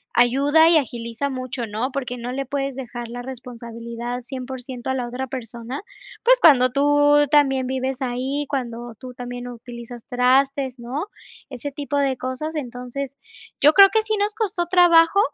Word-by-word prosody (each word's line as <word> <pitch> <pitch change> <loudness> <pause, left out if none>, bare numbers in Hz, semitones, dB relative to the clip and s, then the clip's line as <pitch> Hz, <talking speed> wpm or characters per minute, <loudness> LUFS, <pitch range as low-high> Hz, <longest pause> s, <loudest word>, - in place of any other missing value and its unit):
ayuda 280 +7 +5
y 335 - +6
agiliza 235 0 -2
mucho, 255 -1 -4
¿no?, 225 +5 -3
porque 255 -2 -4
no 240 +1 -5
le 275 +2 -3
puedes 275 0 -3
dejar 240 -2 -6
la 245 +1 -6
responsabilidad 235 -1 -7
100% 255 0 -6
a - - 0
la 250 -2 -2
otra 250 +2 -4
persona, 245 0 -6 0.4
pues, - - +5
cuando 255 - +6
tú 290 +2 +4
también 270 -3 +3
vives 260 +1 -2
ahí, 260 +3 -2
cuando 240 -3 -4
tú 255 -1 -10
también 245 0 -6
utilizas 240 0 -10
trastes, 265 +1 +2
¿no?, 255 +9 -4 0.4
ese 275 +2 -6
tipo 285 +1 -3
de 275 -2 +1
cosas. 260 +6 -5
Entonces 255 0 -5 0.4
yo 300 +2 +6
creo, 395 -1 +9
que 440 +1 +2
sí 435 0 -2
nos 415 +1 0
costó 380 -6 -1
trabajo, 345 0 +5
260 Hz, 160 wpm, -22 LUFS, 245-285 Hz, 0.4 s, creo